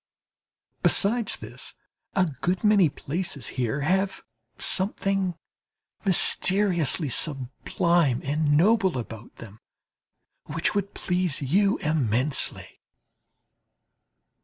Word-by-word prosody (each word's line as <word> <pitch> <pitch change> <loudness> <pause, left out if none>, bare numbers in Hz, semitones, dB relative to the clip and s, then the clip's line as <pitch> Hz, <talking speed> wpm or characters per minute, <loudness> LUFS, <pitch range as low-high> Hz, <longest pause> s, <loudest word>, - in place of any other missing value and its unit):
Besides 225 +3 +2
this, - - -8 0.4
a 190 -2 +3
good 175 +4 -3
many 205 -6 +4
places 150 -2 -4
here 130 +2 -3
have 190 +5 -1 0.3
something 195 -1 +1 0.7
mysteriously 180 -4 +3
sublime 140 +2 0
and 145 +1 0
noble 190 - +2
about 115 -1 -9
them, 110 -2 -13 0.9
which 160 +2 -2
would 200 -1 -3
please 180 -5 -1
you 195 +9 +1
immensely. 135 -2 -1
170 Hz, 85 wpm, -25 LUFS, 140-190 Hz, 0.9 s, many